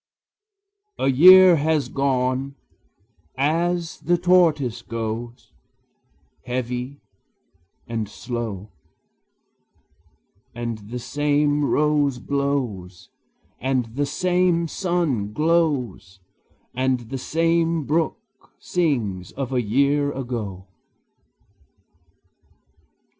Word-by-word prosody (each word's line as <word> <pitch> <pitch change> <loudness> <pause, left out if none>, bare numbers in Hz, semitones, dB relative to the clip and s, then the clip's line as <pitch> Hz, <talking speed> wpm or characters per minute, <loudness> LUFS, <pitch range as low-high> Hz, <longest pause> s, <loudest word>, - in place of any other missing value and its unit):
A 135 - +1
year 180 +5 +8
has 150 -2 0
gone, 135 0 -1 0.8
as 165 +4 0
the 175 0 +1
tortoise 165 -9 +2
goes, 115 +1 -6 0.9
Heavy 125 +2 -4 0.9
and 110 -3 -3
slow; 110 -4 -6 1.8
And 115 -2 -4
the 125 - -5
same 145 +3 0
rose 145 -2 +1
blows, 125 -11 -3 0.5
and 130 -3 -1
the 145 +1 0
same 180 -1 +1
sun 160 - -1
glows, 150 - 0 0.5
And 130 0 0
the 135 - -3
same 165 +2 +1
brook 165 - -3
sings 120 - -2
of 135 -1 -4
a 125 - +2
year 140 +6 +1
ago. 115 -8 -5
135 Hz, 80 wpm, -22 LUFS, 120-160 Hz, 1.8 s, year